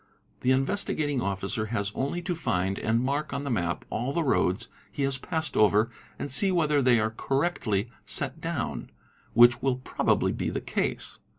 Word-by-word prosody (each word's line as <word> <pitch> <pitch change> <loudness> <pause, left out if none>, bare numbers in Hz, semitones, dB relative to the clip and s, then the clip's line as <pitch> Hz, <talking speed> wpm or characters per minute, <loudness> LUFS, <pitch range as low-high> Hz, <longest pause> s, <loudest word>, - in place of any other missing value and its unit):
The 125 - 0
Investigating 145 0 +1
Officer 100 +2 -2
has 100 -3 -1
only 155 +6 -2
to 175 0 -1
find 95 - -1
and 115 +2 +1
mark 140 +3 -1
on 140 - -2
the 140 - -2
map 85 -6 -1
all 125 +5 -2
the 170 - +1
roads 115 -6 +1 0.2
he 140 - -2
has 135 -1 0
passed 160 +1 -3
over 105 +2 +4 0.3
and 140 - -1
e 195 -1 +3
whether 150 -5 +2
they 125 -3 +5
are 110 +1 0
correctly 125 - 0 0.2
set - - -2
down, - - -3 0.5
which 120 +1 +7
will 135 -2 +2
probably 130 - +1
be - - -2
the - - -2
case. - - -2
130 Hz, 175 wpm, -27 LUFS, 110-145 Hz, 0.5 s, which